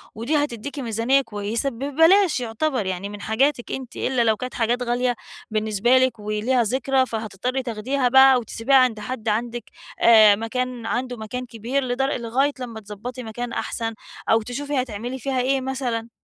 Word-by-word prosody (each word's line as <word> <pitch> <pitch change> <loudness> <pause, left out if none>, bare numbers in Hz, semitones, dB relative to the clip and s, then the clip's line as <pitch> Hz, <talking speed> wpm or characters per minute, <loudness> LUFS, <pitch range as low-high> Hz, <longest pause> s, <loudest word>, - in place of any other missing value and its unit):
ودي 235 +8 -1
هتديكِ 285 -1 -3
ميزانيّة 235 +2 +2
كويّسة 225 +2 -2
ببلاش 315 - +3
يعتبر 245 0 -1
يعني 190 +2 -3
من 205 0 -9
حاجاتك 240 +4 0
أنتِ، 260 -2 -6
إلا 255 -3 0
لو 220 -1 +3
كانت 255 -1 -6
حاجات 240 +2 0
غالية 245 0 0 0.4
بالنسبة 215 +3 +2
لكِ 255 -3 +2
وليها 215 +4 0
ذكرى 260 +3 +1
فهتضطري 230 +3 -3
تاخديها 250 +3 -1
بقى 265 0 +7
وتسبيها 230 +3 0
عند 255 -5 +4
حد 225 +1 -4
عندِك 235 +2 -2 0.4
آآ 215 -3 +7
مكان 240 +2 -3
عنده 245 +1 -2
مكان 240 +4 -5
كبير 240 +4 -2
لد 250 +1 -2
لغاية 270 +1 0
لمّا 235 -3 -6
تضبطي 220 +5 -8
مكان 235 +2 -5
أحسن 225 -1 -3 0.4
أو 225 0 +4
تشوفي 270 +4 -2
هتعملي 245 +2 -5
فيها 260 +1 -1
إيه 265 +1 +1
مثلًا. 250 -4 -3
245 Hz, 160 wpm, -23 LUFS, 225-260 Hz, 0.4 s, بقى